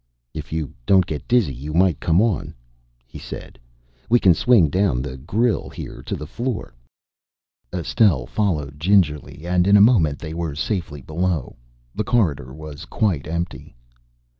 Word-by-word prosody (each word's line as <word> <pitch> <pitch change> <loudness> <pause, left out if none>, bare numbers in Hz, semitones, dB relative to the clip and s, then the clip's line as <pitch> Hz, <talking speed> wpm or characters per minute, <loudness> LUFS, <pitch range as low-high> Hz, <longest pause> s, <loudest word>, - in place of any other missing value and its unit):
"If 75 -2 -7
you 80 -4 -3
don't 95 -2 +5
get 75 - -6
dizzy, 120 - +2
you 75 +5 -6
might 90 -3 +3
come 85 +5 +3
on," 110 -8 -1 0.5
he - - -11
said. - - -9 0.5
"We 120 +1 +5
can 95 -5 +5
swing 105 0 +4
down 90 -10 +1
the 65 -2 -6
grille 105 - 0
here - - -8
to - - -4
the 75 - -6
floor." 120 - -4 1.0
Estelle 80 - +2
followed 75 - -2
gingerly 80 -4 +1
and 90 +1 +2
in 100 +1 +7
a 100 +2 +8
moment 80 - +2
they 80 -1 -7
were 80 -3 -3
safely 80 - -3
below. 85 -2 -2 0.4
The - - -2
corridor 80 - 0
was 75 0 -9
quite 95 -12 -1
empty. 85 -5 -5
85 Hz, 155 wpm, -22 LUFS, 75-100 Hz, 1.0 s, a